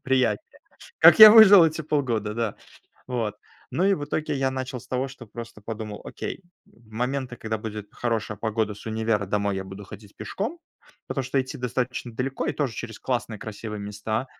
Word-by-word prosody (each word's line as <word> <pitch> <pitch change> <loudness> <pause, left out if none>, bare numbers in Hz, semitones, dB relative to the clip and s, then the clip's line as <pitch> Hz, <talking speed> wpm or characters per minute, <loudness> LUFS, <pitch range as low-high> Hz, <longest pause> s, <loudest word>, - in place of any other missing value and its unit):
приятнее. 130 - 0 0.4
Как - - +8
я 215 -1 +14
выжил 205 -5 +9
эти 160 0 0
полгода, 120 -9 -1
да. 115 -2 -2 0.5
Вот, 115 -5 -2 0.3
ну, 180 - 0
и 200 0 +4
в 145 -5 -5
итоге 150 0 -2
я 135 -1 0
начал 130 -1 -5
с 125 - -18
того, 130 +1 -1
что 135 -2 -12
просто 115 0 -9
подумал: 110 -1 -6
окей, - - -6 0.2
в 115 -2 -24
моменты, 125 +2 -3
когда 110 -1 -3
будет 105 -1 -7
хорошая 115 -3 -2
погода, 110 0 -1
с 105 - -14
универа 110 -2 0
домой 100 0 0
я 95 - -4
буду 95 +2 -9
ходить 105 0 -13
пешком, 230 - -4 0.5
потому 135 - -2
что 135 +1 +1
идти 130 0 -6
достаточно 125 0 -3
далеко 130 +4 -3
и - - 0
тоже 135 -6 -2
через 115 -2 -7
классные 120 -4 -3
красивые 105 0 -7
места. 105 +4 -3
120 Hz, 185 wpm, -25 LUFS, 110-135 Hz, 0.5 s, я